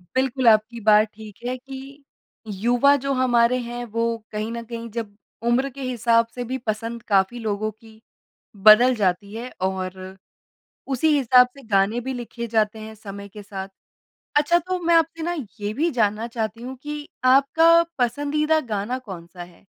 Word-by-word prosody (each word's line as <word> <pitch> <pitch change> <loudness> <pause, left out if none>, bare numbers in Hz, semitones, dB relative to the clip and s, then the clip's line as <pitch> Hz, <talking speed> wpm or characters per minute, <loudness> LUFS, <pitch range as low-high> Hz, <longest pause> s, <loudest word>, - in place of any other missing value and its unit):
बिल्कुल, 260 -1 +1
आपकी 220 +1 +4
बात 215 +1 +5
ठीक 215 -1 -11
है 255 +1 -2
कि 270 +2 -11 0.6
युवा 245 +4 +5
जो 275 0 -1
हमारे 250 -1 +3
हैं, 240 0 -5
वो 230 +1 -1
कहीं 215 +1 -3
न 235 0 -5
कहीं 230 0 -7
जब 220 -3 -5 0.3
उम्र 255 +3 +2
के 275 +1 -11
हिसाब 230 -2 +2
से 245 - -3
भी 255 +2 -3
पसंद 230 0 -4
काफ़ी 195 +5 +2
लोगों 215 -1 -2
की 220 0 -19 0.6
बदल 240 +4 +8
जाती 200 0 -1
है 240 +3 -6 0.2
और 190 0 -5 0.8
उसी 315 +6 +2
हिसाब 250 -1 +6
से 275 - -13
गाने 205 +3 +2
भी 265 +2 -4
लिखे 235 -1 -6
जाते 220 -1 0
हैं 220 0 -9
समय 200 -1 -9
के 205 +1 -11
साथ। 195 -1 -7 0.7
अच्छा, 300 +4 +4
तो 365 +2 -3
मैं 340 -1 +2
आपसे 330 0 +1
ना 345 +1 -1 0.3
ये 205 0 -3
भी 320 +8 +1
जानना 220 -1 0
चाहती 230 -1 -4
हूँ 260 +1 -6
कि 295 0 -6 0.2
आपका 325 +6 +5 0.2
पसंदीदा 290 +5 +1
गाना 210 +5 -1
कौन-सा 180 -6 -9
है? 175 +1 -17
235 Hz, 165 wpm, -23 LUFS, 215-260 Hz, 0.8 s, बदल